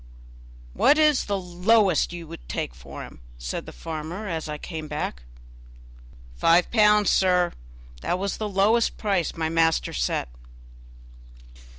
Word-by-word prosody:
"What 290 - +4
is 305 -3 +4
the 200 -1 -1
lowest 180 0 +2
you 175 -1 -7
will - - -9
take - - -3
for 70 +3 -10
him?" - - -13 0.2
said - - -5
the - - -7
farmer 165 +6 -6
as 160 -4 -4
I 150 - -4
came 160 -1 -7
back. 150 - -4 1.1
"Five 170 - +3
pounds, 210 -2 +4
sir; 180 -2 +3 0.5
that 180 - -1
was 195 +1 -3
the 215 -1 -3
lowest 210 +4 +2
price 195 -5 -1
my 160 -1 -1
master 165 0 +1
set." - - -1
175 Hz, 135 wpm, -25 LUFS, 160-205 Hz, 1.1 s, What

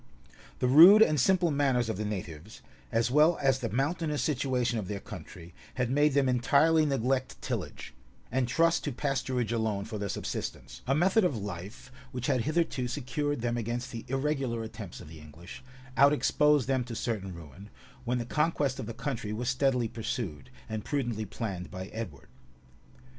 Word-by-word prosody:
The 125 - 0
rude 175 +11 +9
and 155 -8 +1
simple 175 +4 +3
manners 135 -5 +1
of 110 - -2
the 105 +3 -3
natives, 90 -7 -6 0.3
as 115 +1 +1
well 155 +4 +5
as 135 -2 +2
the 115 -4 -3
mountainous 150 - -1
situation 125 -5 0
of 100 - -5
their 100 0 -4
country, 85 -2 -10 0.2
had 125 -1 -1
made 145 +1 +3
them 140 -2 +3
entirely 145 +6 +3
neglect 130 -1 -1
tillage, - - -5 0.4
and 125 0 +1
trust 165 +6 +2
to 145 - -1
pasturage 130 -3 -1
alone 110 -3 -1
for 110 -2 -6
their 100 0 -3
subsistence; - - -5
a 135 - +2
method 190 +7 +3
of 145 -10 +1
life 100 +4 -7 0.2
which 125 -1 -4
had 130 -3 +1
hitherto[*] 155 -5 0
secured 145 +1 -2
them 120 0 -1
against 120 +2 -3
the 115 -1 -6
irregular 135 -3 -1
attempts 110 -5 -8
of - - -11
the 80 0 -11
English, 75 - -12 0.3
out 140 +2 +6
exposed 150 -2 +3
them 130 -2 +1
to 120 -1 -6
certain 105 -5 -3
ruin, 85 +5 -12 0.3
when 125 0 -1
the 120 - -3
conquest 145 -1 0
of 110 - -5
the 115 - -6
country 115 -4 -4
was 120 +3 -2
steadily 130 -2 +1
pursued, 110 - -5 0.2
and 110 -1 -4
prudently 120 -7 -2
planned 100 -3 -5
by 95 0 -6
Edward. 110 -4 -7
125 Hz, 175 wpm, -29 LUFS, 110-140 Hz, 0.4 s, rude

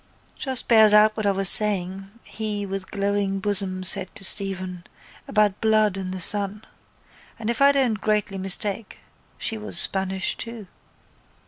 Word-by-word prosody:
—Just 265 -3 +1
bears 220 -2 +5
out 215 0 +4
what 215 -2 -3
I - - +2
was 195 0 +2
saying, 195 -1 +4
he, 210 -2 -6
with 195 -1 -7
glowing 200 -1 -3
bosom 190 -2 -1
said 190 0 0
to 220 - -6
Stephen, 185 -2 -3 0.4
about 210 -2 0
blood 215 -2 +1
and 190 -1 -6
the 185 - -7
sun. 205 +3 0 0.7
And, 225 0 -4
if 235 - -6
I 280 0 +5
don't 255 -6 -1
greatly 210 -2 -2
mistake 195 +3 +1 0.4
she 225 - -2
was 215 -4 -1
Spanish 190 0 -1
too. 230 -3 -9
205 Hz, 150 wpm, -22 LUFS, 190-215 Hz, 0.7 s, bears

